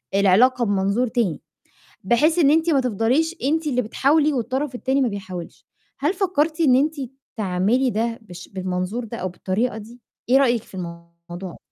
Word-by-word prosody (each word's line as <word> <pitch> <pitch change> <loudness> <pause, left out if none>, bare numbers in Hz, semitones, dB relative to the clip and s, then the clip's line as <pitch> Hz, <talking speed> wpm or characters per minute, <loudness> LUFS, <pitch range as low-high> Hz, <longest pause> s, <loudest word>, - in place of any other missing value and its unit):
العلاقة 235 +6 +4
بمنظور 200 +4 +1
تاني، 220 - -1 0.6
بحيث 300 - +3
إن 290 -4 +5
أنتِ 325 +2 +3
ما 280 -4 +3
تفضليش 255 - +1
أنتِ 310 +3 0
اللي 250 -3 +1
بتحاولي 290 +6 +2
والطرف 260 +2 -2
التاني 265 +2 0
ما 260 - +2
بيحاولش. 190 -4 -8 0.3
هل 295 +6 +1
فكّرتِ 335 -5 0
إن 270 -6 +5
أنتِ 300 +4 +2 0.4
تعملي 210 +6 +1
ده 230 +1 -2
بالش 180 -5 -11
بالمنظور 185 +4 -3
ده 230 +1 -7
أو 185 - -3
بالطريقة 205 +6 -2
دي؟ 225 +3 -11 0.3
إيه 260 - +6
رأيِك 245 -5 +2
في - - -14
الموضوع؟ 170 0 -9
240 Hz, 160 wpm, -22 LUFS, 190-275 Hz, 0.6 s, إيه